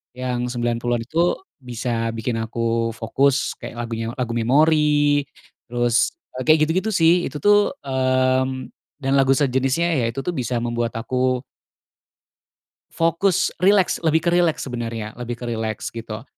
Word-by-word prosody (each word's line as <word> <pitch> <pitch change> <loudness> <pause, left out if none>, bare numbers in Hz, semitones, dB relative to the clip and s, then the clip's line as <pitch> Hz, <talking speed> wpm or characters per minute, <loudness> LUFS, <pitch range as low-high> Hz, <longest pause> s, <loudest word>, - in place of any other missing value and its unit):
yang 125 -1 -2
90-an 120 -1 -1
itu 165 +8 +1 0.2
bisa 120 -2 -3
bikin 115 0 -2
aku 115 0 -1
fokus 135 +5 +1
kayak - - -8
lagunya 115 -1 -4
lagu 125 -3 -2
memori, 145 +3 +3 0.4
terus 120 - +1 0.3
kayak 155 0 +6
gitu-gitu, 185 +8 0
sih. 175 +1 +4
Itu 150 - -8
tuh, 205 +5 +4
mmm, 130 0 0 0.3
dan 135 - 0
lagu 135 0 +4
sejenisnya, 135 +4 +1
ya, 115 - +1
itu, 135 +3 -5
tuh, 180 - -1
bisa 125 -5 -3
membuat 120 -1 -2
aku 125 +2 -1 1.5
fokus, 165 +3 +1
rileks, 190 0 +3
lebih 160 0 +3
ke 170 - +4
rileks 175 -2 +2
sebenarnya, 115 -3 -4
lebih 120 0 -4
ke 120 - -9
rileks, 110 -1 -3
gitu. 115 -1 -7
130 Hz, 135 wpm, -22 LUFS, 115-150 Hz, 1.5 s, kayak